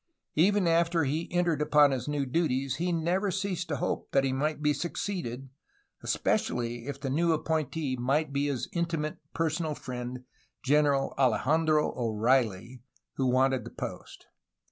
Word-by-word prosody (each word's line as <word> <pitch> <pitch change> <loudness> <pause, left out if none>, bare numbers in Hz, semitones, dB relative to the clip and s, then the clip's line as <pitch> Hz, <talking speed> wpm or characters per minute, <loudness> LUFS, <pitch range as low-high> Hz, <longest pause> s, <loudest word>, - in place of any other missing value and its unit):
Even 195 +4 +3
after 165 0 +3
he 150 +4 -2
entered 175 -4 +1
upon 150 -1 +5
his 130 -1 -3
new 145 -1 -1
duties 135 -2 0
he 175 +2 -1
never 175 +4 0
ceased 190 -2 -2
to 150 - -2
hope 135 - -2
that 135 - +4
he 135 -1 0
might 150 +4 -1
be 150 0 +2
succeeded, 145 -6 -4 0.5
espe - - -2 0.2
cially 120 0 -4
if 140 -1 -5
the 135 - -4
new 165 +4 +2
appointee 155 -3 -1
might 140 +4 0
be 140 +1 +1
his 140 -4 -2
intimate 165 -3 -2 0.2
personal 160 -1 -1
friend 125 -1 -6 0.4
General 145 -1 +2
Alejandro 150 +5 +2
O'Reilly, 115 0 0 0.4
who 130 - +1
wanted 130 0 +2
the - - -8
post. - - -8
145 Hz, 150 wpm, -29 LUFS, 130-165 Hz, 0.5 s, upon